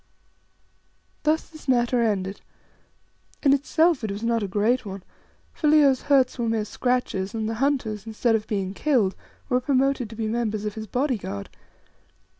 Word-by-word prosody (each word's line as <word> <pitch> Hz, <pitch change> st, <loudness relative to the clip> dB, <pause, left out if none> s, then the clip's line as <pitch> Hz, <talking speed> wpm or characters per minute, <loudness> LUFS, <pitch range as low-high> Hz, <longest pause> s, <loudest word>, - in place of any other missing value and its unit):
Thus 310 Hz, +1 st, +1 dB
this 310 Hz, -2 st, -14 dB
matter 240 Hz, -1 st, +2 dB
ended. 200 Hz, -3 st, -1 dB, 1.0 s
In 275 Hz, -2 st, +5 dB
itself 310 Hz, +1 st, +2 dB
it 220 Hz, -, -2 dB
was 200 Hz, +3 st, -5 dB
not 230 Hz, -1 st, +1 dB
a 200 Hz, -, -2 dB
great 215 Hz, +6 st, +1 dB
one, 195 Hz, -3 st, -7 dB, 0.5 s
for 305 Hz, -, -1 dB
Leo's 290 Hz, -4 st, +5 dB
hurts 265 Hz, -3 st, +2 dB
were 230 Hz, -1 st, 0 dB
mere 220 Hz, -2 st, 0 dB
scratches, 215 Hz, -4 st, -1 dB
and 220 Hz, -1 st, -2 dB
the 225 Hz, -, -2 dB
hunters, 230 Hz, -7 st, 0 dB
instead 225 Hz, +1 st, +1 dB
of 220 Hz, -1 st, 0 dB
being 195 Hz, -3 st, -2 dB
killed, 225 Hz, -6 st, +1 dB, 0.3 s
were 250 Hz, 0 st, +1 dB
promoted 270 Hz, -2 st, +1 dB
to 225 Hz, -, -9 dB
be 225 Hz, 0 st, -3 dB
members 215 Hz, -2 st, -1 dB
of 210 Hz, -, -2 dB
his 220 Hz, 0 st, -7 dB
body 255 Hz, +2 st, 0 dB
guard. 100 Hz, -, -6 dB
230 Hz, 165 wpm, -25 LUFS, 210-265 Hz, 1.0 s, In